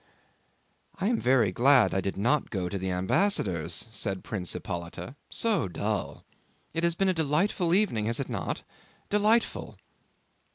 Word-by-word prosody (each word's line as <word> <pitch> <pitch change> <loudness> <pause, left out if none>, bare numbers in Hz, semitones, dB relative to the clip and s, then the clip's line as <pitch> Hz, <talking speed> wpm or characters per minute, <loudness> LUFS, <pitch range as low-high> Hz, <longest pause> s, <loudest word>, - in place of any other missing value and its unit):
"I 195 +3 +1
am 235 - 0
very 120 -6 +3
glad 130 +4 +5
I 95 - +1
did 95 0 -3
not 125 +8 +1
go 95 -4 -2
to 100 - -3
the 95 0 -3
ambassador's," 90 - +1
said 100 -3 -2
Prince 90 -6 -3
Hippolyte 85 +8 -6 0.2
"—so 215 - 0
dull—. 85 - -3 0.5
It 165 +1 -2
has 170 -1 +2
been 195 +2 +2
a - - +3
delightful 165 +3 +1
evening, 180 - +1
has 115 +1 +1
it 140 - -2
not? 110 -7 -4 0.5
Delightful!" 215 +3 +1
120 Hz, 150 wpm, -28 LUFS, -, 0.5 s, glad